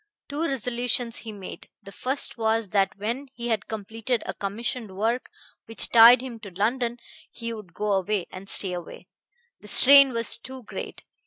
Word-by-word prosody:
Two 290 +2 -4
resolutions 245 -2 -1
he 225 - -8
made. 200 -3 -10
The 195 - -11
first 260 +7 -1
was 225 -2 0
that 195 -1 0
when 235 +7 -4
he 240 0 -5
had 220 -3 -1
completed 225 +3 -3
a - - -4
commissioned 205 0 -5
work 230 +4 -1 0.4
which 225 - +1
tied 235 +1 +8
him 240 -3 -8
to 210 -2 -10
London 235 +6 -1 0.3
he 230 0 -6
would 200 -6 -11
go 210 0 -2
away, 195 0 0
and 190 +1 -9
stay 190 -2 +3
away. 175 -1 -9 0.5
The 210 - -15
strain 275 +5 +8
was 230 -1 +1
too 260 +1 -10
great. - - -8
225 Hz, 170 wpm, -25 LUFS, 205-245 Hz, 0.5 s, tied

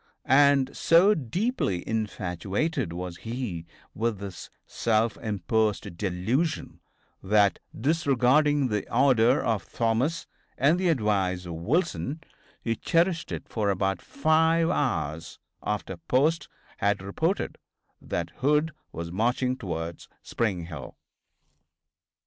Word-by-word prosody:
And 135 0 +4
so 175 +6 +5
deeply 150 - -1
infatuated 105 - -2
was 90 0 -5
he 115 -9 -5 0.3
with 115 0 -1
this 95 -6 -8 0.2
self 110 -1 +1
imposed 105 -1 -1
delusion 110 - -1 0.4
that, 100 0 +3 0.2
disregarding 140 0 +3
the 105 -2 -2
order 125 0 +4
of 115 -4 -1
Thomas 120 +9 0 0.3
and 155 +7 +3
the 185 -2 +2
advice 100 - +1
of 85 - -5
Wilson, 135 - -1 0.4
he 115 -1 0
cherished 170 +4 +1
it - - -5
for 105 -3 -1
about 95 0 0
five 160 +3 +2
hours 80 - -2 0.2
after 100 -3 -3
Post 140 - +1 0.3
had 100 -1 0
reported 160 - -1 0.4
that - - -3
Hood 150 +3 +2 0.2
was 85 +1 -6
marching 125 +6 +1
towards 85 -6 -5
Spring 95 -7 -1
Hill. 80 -3 -9
115 Hz, 110 wpm, -27 LUFS, 95-145 Hz, 0.4 s, so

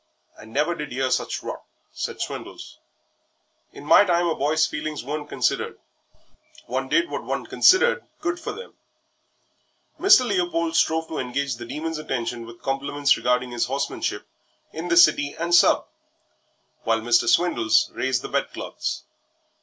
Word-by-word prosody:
"I - - -14
never 145 +9 0
did 150 -3 -6
'ear 130 +1 -1
such - - -1
rot," - - -6 0.3
said - - -5
Swindles. - - -7 0.9
"In 145 - -12
my 155 - +7
time 175 -3 +1
a 170 - +1
boy's 150 +2 +2
feelings 150 -2 -4
weren't 150 +2 -5
considered - - -1 0.9
one - - -3
did 350 0 +2
what - - -4
one - - -3
considered 485 +5 +4 0.2
good 340 +1 -2
for 325 - -5
them." 465 +3 -10 1.3
Mr. 365 -9 +6
Leopold 175 -5 -1
strove 160 0 +2
to 160 - -4
engage 130 0 -2
the 120 0 -8
Demon's 155 +4 -4
attention 120 -5 -4
with 115 0 -13
compliments 140 +1 +1
regarding 125 0 0
his 120 -1 0
horsemanship 135 +2 -3 0.5
in 165 +2 -5
the 170 -1 +2
City 145 -4 +5
and 170 +1 -2
Sub. 175 - +5 1.0
while 115 0 0
Mr. 120 +1 +3
Swindles 120 -11 +3
raised 130 -1 -1
the - - -4
bedclothes. - - -3
150 Hz, 145 wpm, -23 LUFS, 125-170 Hz, 1.3 s, my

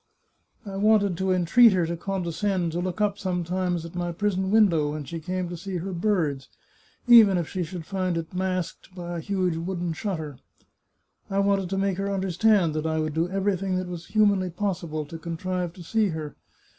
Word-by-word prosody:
I 195 -1 -6
wanted 205 -2 +3
to 190 +1 0
entreat 185 +6 +6
her 180 -2 +2
to 170 +1 -2
condescend 185 0 -1
to 170 - -2
look 180 +2 -3
up 205 -1 +1
sometimes 180 -1 -1
at 165 - -9
my 175 -1 -2
prison 190 +1 -1
window 190 -9 +4
when 155 -1 -4
she 165 +4 -6
came 180 +2 -3
to 175 - -5
see 185 +2 -5
her 185 +3 -4
birds, 170 -8 0 0.6
even 220 -6 +8
if 170 -2 -1
she 185 - -4
should 175 -1 -5
find 185 -2 -1
it 165 +1 -5
masked 185 -1 -3
by 175 -1 -5
a - - -4
huge 185 -2 -1
wooden 175 0 -3
shutter! 160 - -4 0.9
I 195 - -2
wanted 200 -2 +2
to 195 - -2
make 195 -1 0
her 200 0 -1
understand 190 -2 +2
that 155 +1 -2
I 160 0 0
would 155 -1 -1
do 165 +3 0
everything 195 -1 0
that 185 0 -2
was 175 -1 -7
humanly 200 -3 +3
possible 170 -5 -3
to 165 +3 -9
contrive 175 +1 -3
to 175 - -11
see 220 +5 +1
her. 155 -4 -5
180 Hz, 195 wpm, -26 LUFS, 170-195 Hz, 0.9 s, even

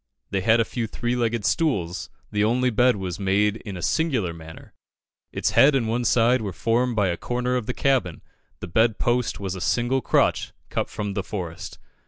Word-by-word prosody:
They 95 - 0
had 110 +4 +4
a 115 - +3
few 115 0 -3
three 120 +3 -2
legged 115 -3 -1
stools; 95 - 0 0.2
the 105 0 +1
only 125 +3 +2
bed 125 +3 +3
was 95 -2 -5
made 100 +2 +1
in 100 -4 -8
a 85 - -7
singular 130 - 0
manner. 80 -1 -12 0.6
Its - - -1
head 140 +1 +6
and 120 -4 +1
one 120 +2 -1
side 120 +2 +3
were 100 -3 -3
formed 120 +5 0
by 100 -3 +2
a 85 - -2
corner 125 +4 -2
of 120 -4 -2
the 125 - -1
cabin, 130 - 0 0.4
the - - -5
bed 110 +5 +2
post 120 0 0
was 95 -2 -3
a 95 - -7
single 120 +6 +1
crotch - - +1 0.2
cut - - -1
from 105 -1 -4
the 100 - -1
forest. 90 -4 -6
115 Hz, 200 wpm, -24 LUFS, 95-125 Hz, 0.6 s, head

